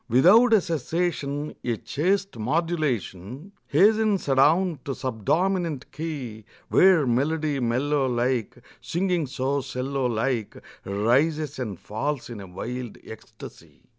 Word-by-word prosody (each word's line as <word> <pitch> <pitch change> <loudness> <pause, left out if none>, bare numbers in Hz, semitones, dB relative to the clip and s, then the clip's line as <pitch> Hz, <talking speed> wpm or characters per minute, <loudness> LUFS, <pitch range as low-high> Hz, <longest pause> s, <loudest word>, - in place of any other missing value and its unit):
Without 185 - +6
a 215 - +6
cessation 155 -3 -2
A 120 -2 -1
chaste 195 - -1
modulation 135 - -2 0.2
Hastens 215 -2 +3
adown 150 +5 +3
to 135 - -4
subdominant 155 - -1
key, 135 -9 -6 0.3
Where 185 -6 +5
melody 145 +4 0
mellow 130 +4 +1
like 120 -1 -1 0.2
Singing 175 -3 -1
so 135 +2 -1
'cello 130 0 -2
like 115 -1 -2 0.3
Rises 135 +9 +1
and 105 -8 -4
falls 130 +4 -4
in 110 -4 -7
a 95 - -9
wild 120 +6 -6
ecstasy. 80 - -13
140 Hz, 110 wpm, -25 LUFS, 120-165 Hz, 0.3 s, Without